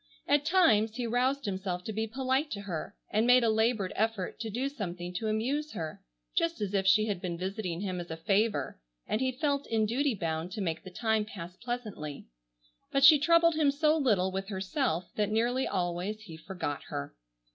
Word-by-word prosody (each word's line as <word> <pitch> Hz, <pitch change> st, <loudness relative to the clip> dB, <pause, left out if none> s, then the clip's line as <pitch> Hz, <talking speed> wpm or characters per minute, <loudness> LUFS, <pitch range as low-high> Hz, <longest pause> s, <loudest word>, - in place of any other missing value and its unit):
At 290 Hz, 0 st, +3 dB
times 225 Hz, -, +4 dB
he 245 Hz, -1 st, -2 dB
roused 250 Hz, +3 st, +1 dB
himself 190 Hz, -2 st, -3 dB
to 220 Hz, -, -5 dB
be 220 Hz, +2 st, -1 dB
polite 265 Hz, +5 st, 0 dB
to 200 Hz, -, -5 dB
her, 175 Hz, -6 st, -5 dB, 0.2 s
and 220 Hz, +3 st, +2 dB
made 250 Hz, 0 st, +6 dB
a 225 Hz, -, +4 dB
labored 220 Hz, -3 st, +1 dB
effort 220 Hz, -3 st, -1 dB
to 225 Hz, -1 st, -3 dB
do 245 Hz, +6 st, -1 dB
something 180 Hz, -10 st, -5 dB
to 220 Hz, +5 st, -2 dB
amuse 265 Hz, +8 st, -1 dB
her, 160 Hz, -1 st, -5 dB, 0.3 s
just 335 Hz, -3 st, +1 dB
as 205 Hz, -2 st, -2 dB
if 195 Hz, -1 st, +1 dB
she 215 Hz, +3 st, +5 dB
had 200 Hz, -5 st, -2 dB
been 175 Hz, -3 st, -3 dB
visiting 185 Hz, -1 st, -3 dB
him 185 Hz, -3 st, -2 dB
as 175 Hz, -, -7 dB
a 160 Hz, -, -5 dB
favor 200 Hz, -, 0 dB, 0.3 s
and 215 Hz, -, 0 dB
he 260 Hz, 0 st, +1 dB
felt 280 Hz, +1 st, -1 dB
in 220 Hz, -1 st, +2 dB
duty 255 Hz, +3 st, +1 dB
bound 165 Hz, -1 st, -3 dB
to 220 Hz, -, -5 dB
make 165 Hz, -4 st, -2 dB
the 185 Hz, -, -8 dB
time 220 Hz, +3 st, 0 dB
pass 180 Hz, -4 st, -8 dB
pleasantly, 215 Hz, -, -5 dB, 0.7 s
but 275 Hz, -, +2 dB
she 290 Hz, +1 st, +9 dB
troubled 335 Hz, +2 st, +5 dB
him 310 Hz, -2 st, +3 dB
so 300 Hz, +2 st, +3 dB
little 210 Hz, -, +2 dB
with 195 Hz, +1 st, -3 dB
herself, 190 Hz, -, -1 dB
that 210 Hz, -1 st, +1 dB
nearly 240 Hz, +4 st, +1 dB
always 180 Hz, +3 st, -2 dB
he 180 Hz, -7 st, -10 dB
forgot 160 Hz, -3 st, -4 dB
her. 70 Hz, -, -5 dB
215 Hz, 200 wpm, -30 LUFS, 185-255 Hz, 0.7 s, she